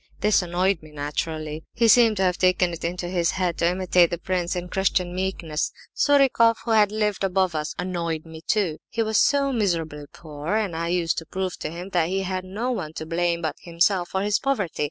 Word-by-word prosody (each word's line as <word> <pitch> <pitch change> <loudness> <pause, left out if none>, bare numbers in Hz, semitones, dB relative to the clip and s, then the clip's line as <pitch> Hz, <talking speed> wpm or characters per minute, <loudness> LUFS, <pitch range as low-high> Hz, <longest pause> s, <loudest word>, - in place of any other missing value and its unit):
This 210 -1 +4
annoyed 180 +1 0
me, 155 - -14
naturally. 150 +1 -4
He 230 0 +3
seemed 225 -2 +6
to 190 - +1
have 180 -1 +1
taken 185 -1 +3
it 165 - -7
into 175 +1 -3
his 175 -2 0
head 180 -3 -1
to 170 - +3
imitate 180 -1 +3
the 175 - -3
prince 180 0 -2
in 180 0 -4
Christian 180 -1 0
meekness! 180 -4 -2 0.2
Surikoff, 265 -5 +4
who 230 - -1 0.2
lived 210 -2 -1
above 190 -2 +1
us, 150 -1 -3
annoyed 170 -3 -3
me, 160 -1 -10
too. 190 -8 +1
He 230 -1 -1
was 220 -1 +1
so 280 -1 +3
miserably 165 -9 -1
poor, 155 +4 -5
and 205 -6 -1
I 165 +1 -2
used 170 -1 0
to 165 - -12
prove 190 -1 -3
to - - -4
him 175 +4 -7
that 175 -3 +1
he 195 +1 -1
had 185 0 -3
no 215 +7 -3
one 165 -10 -4
to 160 - -6
blame 170 +1 -1
but 155 -2 -2
himself 175 +1 +1
for 190 0 -1
his 205 0 +1
poverty. 255 -11 -2
180 Hz, 210 wpm, -24 LUFS, 165-195 Hz, 0.2 s, seemed